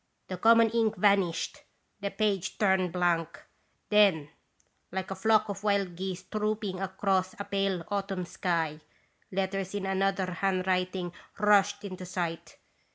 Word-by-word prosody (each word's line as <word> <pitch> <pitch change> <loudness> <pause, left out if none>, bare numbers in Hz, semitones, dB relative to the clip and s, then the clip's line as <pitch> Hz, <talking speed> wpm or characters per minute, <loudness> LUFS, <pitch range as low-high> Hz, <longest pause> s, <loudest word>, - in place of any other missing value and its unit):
The 185 - -4
common 230 +3 +5
ink 225 -2 +1
vanished. 195 -3 +2 0.4
The 200 0 -2
page 200 -3 -1
turned 190 -3 +2
blank. 170 -2 0 0.5
Then, 195 -8 +4 0.6
like 190 +1 -4
a - - -2
flock 215 +2 +3
of 200 0 -5
wild 200 -4 +1
geese 185 0 -4
trooping 210 -3 -2
across 190 -1 0
a - - -2
pale 195 -3 -1
autumn 195 -2 -2
sky, 165 -4 -1 0.5
letters 195 0 -2
in 200 -1 -2
another 195 0 +1
handwriting 185 -1 -1 0.2
rushed 205 -1 +3
into 185 -2 -7
sight. 170 -2 -4
195 Hz, 130 wpm, -29 LUFS, 180-205 Hz, 0.6 s, common